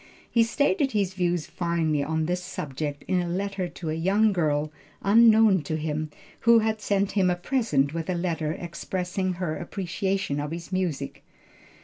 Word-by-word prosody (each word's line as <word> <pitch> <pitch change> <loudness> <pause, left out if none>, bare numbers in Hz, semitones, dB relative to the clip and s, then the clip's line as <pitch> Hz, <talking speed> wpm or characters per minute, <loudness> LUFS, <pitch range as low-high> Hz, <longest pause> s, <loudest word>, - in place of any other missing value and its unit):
He 235 - +4
stated 285 +4 +1
his 200 -3 0
views 175 -3 0
finely 165 -4 0
on 160 +2 -1
this 180 +2 -2
subject 145 -1 -5
in 185 -1 +2
a 175 - -3
letter 195 +1 -2
to 165 -1 -5
a - - -1
young 200 +6 +2
girl, 150 -3 0 0.3
unknown 220 -2 +6
to 155 - -2
him, 155 0 -2 0.3
who 235 0 +6
had 220 -1 +1
sent 200 -1 +1
him 190 -3 +2
a 180 - +2
present 175 - 0
with 165 0 -4
a 180 - +1
letter 165 -3 -1
expressing 180 +2 -3
her 170 -3 -3
appreciation 190 -3 -2
of 145 0 -3
his 165 +3 -7
music. 165 -7 -2
180 Hz, 165 wpm, -26 LUFS, 160-200 Hz, 0.3 s, unknown